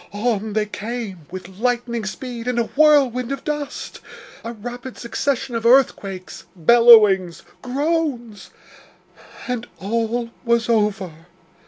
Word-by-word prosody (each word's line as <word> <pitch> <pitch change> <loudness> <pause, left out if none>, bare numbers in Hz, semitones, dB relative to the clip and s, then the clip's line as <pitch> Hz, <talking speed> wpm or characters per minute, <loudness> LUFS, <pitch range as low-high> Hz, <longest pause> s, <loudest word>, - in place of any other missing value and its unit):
On 215 -1 -1
they 215 0 +1
came, 210 -6 -6
with 185 +1 -10
lightning 240 -2 -1
speed, 240 +1 -6
in 250 -1 -1
a 235 - +3
whirlwind 275 -5 +4
of 275 -1 -4
dust. 295 -2 -5 0.4
A 230 - -5
rapid 245 +3 -8
succession 265 +1 -2
of 230 -1 -2
earthquakes 220 -7 +1
bellowings 195 -3 +5 0.2
groans, 265 - -2 1.0
and 245 -1 -3
all 230 +3 -2
was 235 -1 +1
over. 195 -7 -1
235 Hz, 115 wpm, -21 LUFS, 205-250 Hz, 1.0 s, bellowings